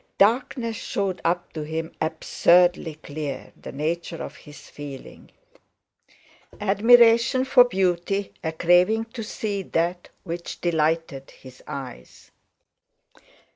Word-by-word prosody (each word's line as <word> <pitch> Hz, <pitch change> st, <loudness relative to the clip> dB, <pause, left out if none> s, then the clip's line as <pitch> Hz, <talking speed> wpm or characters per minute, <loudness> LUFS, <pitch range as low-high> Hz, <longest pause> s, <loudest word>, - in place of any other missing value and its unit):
Darkness 230 Hz, +1 st, +1 dB
showed 195 Hz, -2 st, -3 dB
up 175 Hz, +1 st, -1 dB
to 155 Hz, -, -5 dB
him 160 Hz, +2 st, -4 dB
absurdly 170 Hz, +1 st, +2 dB
clear 145 Hz, -2 st, -6 dB
the -, -, -10 dB
nature 165 Hz, +4 st, -3 dB
of -, -, -8 dB
his 150 Hz, 0 st, -14 dB
feeling. 140 Hz, -2 st, -10 dB, 1.3 s
Admiration 230 Hz, +4 st, +5 dB
for 255 Hz, -1 st, +6 dB
beauty—a 190 Hz, -4 st, -1 dB
craving 180 Hz, +7 st, +3 dB
to 235 Hz, -, -5 dB
see 210 Hz, -2 st, -3 dB
that 175 Hz, 0 st, -2 dB
which 170 Hz, -1 st, -6 dB
delighted 160 Hz, -4 st, -1 dB
his 130 Hz, -1 st, -15 dB
eyes. 130 Hz, -3 st, -9 dB
175 Hz, 100 wpm, -24 LUFS, 160-205 Hz, 1.3 s, for